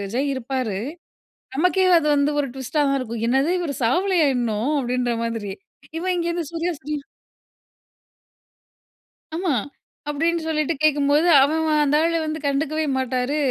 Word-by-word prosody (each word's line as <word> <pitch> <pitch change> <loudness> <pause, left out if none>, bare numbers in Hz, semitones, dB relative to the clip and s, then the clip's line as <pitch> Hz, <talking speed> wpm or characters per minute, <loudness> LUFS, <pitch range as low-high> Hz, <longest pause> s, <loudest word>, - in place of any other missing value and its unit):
ஜெய் 275 +2 0
இருப்பாரு. 255 -5 -3 0.8
நமக்கே 365 +4 +3
அது 300 - -2
வந்து 285 +1 +2
ஒரு 280 - -1
ட்விஸ்ட்டா 265 +3 -2
தான் 275 0 +1
இருக்கும். 230 -2 -5
"என்னது 270 +6 +2
இவர் 300 -5 -3
சாவலயா 345 +6 +2
இன்னும்?" 235 +2 -1
அப்டீன்ற 245 -1 -1
மாதிரி. 225 -4 -3 0.5
இவ 350 - -5
இங்கே 340 -1 -1
இருந்து 340 -4 -3
"சூர்யா 335 +1 -1
சூர்யா" 295 +1 -4 2.4
ஆமா. 350 -1 0 0.6
அப்டின்னு 330 +3 0
சொல்லிட்டு 305 0 0
கேட்கும்போது, 295 +2 +3
அவன் 315 +4 +2 0.2
அந்த 290 +1 +2
ஆளு 335 0 +1
வந்து 310 0 -3
கண்டுக்கவே 305 +2 0
மாட்டாரு. 260 +2 -1
290 Hz, 135 wpm, -22 LUFS, 255-320 Hz, 2.4 s, நமக்கே